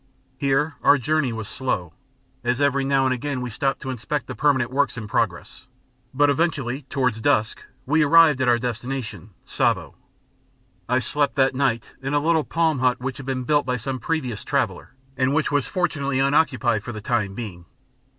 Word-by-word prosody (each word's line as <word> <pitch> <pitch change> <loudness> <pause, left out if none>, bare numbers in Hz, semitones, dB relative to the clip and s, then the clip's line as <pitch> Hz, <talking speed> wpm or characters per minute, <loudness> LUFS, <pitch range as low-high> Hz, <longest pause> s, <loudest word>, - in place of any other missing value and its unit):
Here 140 +2 +1
our 145 - +6
journey 140 0 0
was 110 -2 -5
slow, 95 -10 -3 0.5
as 120 +1 0
every 140 -1 +2
now 135 0 +2
and 130 - +2
again 135 +1 -3
we 125 -1 -4
stopped 135 +5 -1
to 130 - -3
inspect 130 +3 -3
the 130 - -6
permanent 130 -1 +1
works 140 -1 0
in 110 -2 -5
progress; - - -2 0.4
but 145 +2 +3
eventually, 140 -3 -1
towards 125 -5 0
dusk, 110 -5 +1 0.2
we 150 +4 +2
arrived 150 -2 +6
at 130 - +1
our 120 -1 +5
destination, 120 -4 -5 0.2
Tsavo. - - 0 1.0
I 125 - +3
slept 140 +4 0
that 135 -1 +3
night 130 -4 -1
in 135 +2 -2
a - - +4
little 160 +1 +2
palm 160 -4 0
hut 125 -1 +2
which 130 +1 -4
had 135 - -9
been 130 -1 -2
built 145 +2 +1
by 125 0 0
some 130 +3 -4
previous 125 -4 -3
traveller, 125 -7 -2 0.2
and 130 +2 +1
which 160 - +1
was 145 -2 +1
fortunately 145 -7 -1
unoccupied 135 -6 +2
for 120 - -6
the 110 -2 -7
time 105 -4 -1
being. 95 -7 -7
130 Hz, 180 wpm, -23 LUFS, 120-145 Hz, 1.0 s, our